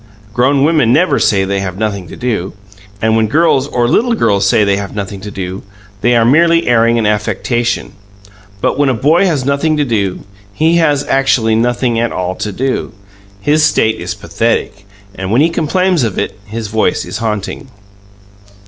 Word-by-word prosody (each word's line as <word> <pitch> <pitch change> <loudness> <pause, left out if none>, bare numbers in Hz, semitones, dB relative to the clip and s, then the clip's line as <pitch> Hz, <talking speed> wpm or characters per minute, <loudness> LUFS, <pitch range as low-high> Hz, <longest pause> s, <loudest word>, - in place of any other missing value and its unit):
Grown 135 +4 +2
women 150 -6 +3
never 175 +8 +3
say 95 -2 +2
they 100 0 -1
have 95 -2 -4
nothing 100 -4 -3
to - - -10
do, 110 -7 -3 0.5
and 110 0 +2
when 110 -1 +2
girls 140 +1 +2
or 120 -4 0
little 235 - +2
girls 100 - +1
say 105 - +3
they 100 -1 +1
have 100 0 -6
nothing 100 -1 -5
to 105 - -7
do, 95 -1 -6 0.4
they 120 +3 +3
are 115 -1 +3
merely 165 +6 +4
airing 115 0 +3
an 115 - 0
affectation. 115 +3 -1 0.7
But - - 0
when 145 -2 +3
a 130 - +1
boy 155 - +3
has 145 -7 -1
nothing 140 +3 +1
to 145 - +1
do, 100 -7 -1 0.3
he 165 +2 +2
has 145 -4 +2
actually 135 -4 +2
nothing 120 +1 0
at 120 0 0
all 90 0 -2
to 105 - -3
do; 130 +6 -3 0.5
his 150 +7 +2
state 110 -6 +2
is - - -4
pathetic, 100 0 -2 0.3
and 95 -1 -5
when 120 +5 +3
he 160 - +3
complains 175 +2 +1
of 110 -5 -2
it - - -2
his 110 +1 -5
voice 110 +1 0
is 110 - -6
haunting. 110 +4 -4
120 Hz, 185 wpm, -14 LUFS, 105-145 Hz, 0.7 s, merely